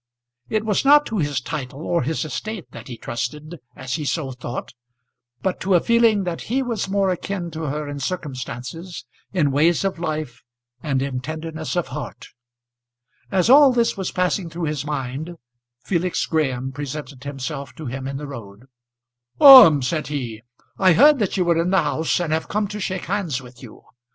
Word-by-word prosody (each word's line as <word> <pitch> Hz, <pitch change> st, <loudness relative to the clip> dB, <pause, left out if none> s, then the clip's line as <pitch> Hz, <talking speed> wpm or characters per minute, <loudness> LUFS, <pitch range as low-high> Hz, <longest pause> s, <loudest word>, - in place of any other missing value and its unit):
It 215 Hz, 0 st, -1 dB
was 210 Hz, -3 st, +1 dB
not 290 Hz, +2 st, +6 dB
to 220 Hz, -3 st, -3 dB
his 145 Hz, -3 st, 0 dB
title 135 Hz, +1 st, -6 dB
or 170 Hz, -, +1 dB
his 155 Hz, +4 st, -2 dB
estate 170 Hz, -, -6 dB
that -, -, -10 dB
he 120 Hz, -, -7 dB
trusted 150 Hz, +9 st, -5 dB, 0.2 s
as 130 Hz, -1 st, -5 dB
he 155 Hz, -, -2 dB
so 145 Hz, -1 st, -2 dB
thought, 125 Hz, -1 st, -6 dB, 0.7 s
but 190 Hz, -, -1 dB
to 190 Hz, -1 st, +2 dB
a -, -, +6 dB
feeling 230 Hz, -1 st, +3 dB
that 175 Hz, -2 st, -4 dB
he 265 Hz, +3 st, +1 dB
was 230 Hz, -6 st, -3 dB
more 195 Hz, -1 st, +1 dB
akin 180 Hz, -1 st, -4 dB
to 160 Hz, 0 st, -5 dB
her 150 Hz, +1 st, -3 dB
in 145 Hz, 0 st, -5 dB
circumstances, 145 Hz, +2 st, -6 dB, 0.3 s
in 155 Hz, -7 st, +1 dB
ways 160 Hz, +6 st, +2 dB
of 190 Hz, -3 st, -2 dB
life, 155 Hz, -7 st, -4 dB, 0.4 s
and 135 Hz, -3 st, -1 dB
in 135 Hz, -2 st, -3 dB
tenderness 155 Hz, +4 st, -5 dB
of 175 Hz, -, -1 dB
heart. -, -, -7 dB, 1.0 s
As 190 Hz, -1 st, +2 dB
all 275 Hz, +2 st, +8 dB
this 235 Hz, -2 st, +1 dB
was 190 Hz, -2 st, -3 dB
passing 180 Hz, -1 st, -1 dB
through 170 Hz, +1 st, -6 dB
his 150 Hz, -2 st, -2 dB
mind, 145 Hz, +3 st, -4 dB, 0.5 s
Felix 180 Hz, -1 st, -1 dB
Graham 135 Hz, -5 st, -1 dB
presented 145 Hz, -1 st, -7 dB
himself 140 Hz, 0 st, -6 dB
to 155 Hz, -, -8 dB
him 135 Hz, +1 st, -5 dB
in 135 Hz, 0 st, -4 dB
the 145 Hz, -, -6 dB
road. 115 Hz, -5 st, -10 dB, 0.7 s
"Orme," 255 Hz, -, +10 dB
said 150 Hz, +3 st, -2 dB
he, 120 Hz, -7 st, -4 dB, 0.4 s
"I 185 Hz, -2 st, +5 dB
heard 285 Hz, -, +6 dB
that 205 Hz, -2 st, -1 dB
you 180 Hz, -, +2 dB
were 170 Hz, -1 st, +3 dB
in 175 Hz, -, -1 dB
the 190 Hz, -3 st, +3 dB
house, 155 Hz, +3 st, 0 dB
and 165 Hz, -3 st, -1 dB
have 160 Hz, -, -1 dB
come 210 Hz, 0 st, 0 dB
to 210 Hz, 0 st, -6 dB
shake 190 Hz, -2 st, -3 dB
hands 175 Hz, -8 st, -2 dB
with 125 Hz, -2 st, -14 dB
you. 120 Hz, -5 st, -13 dB
160 Hz, 185 wpm, -22 LUFS, 135-190 Hz, 1.0 s, Orme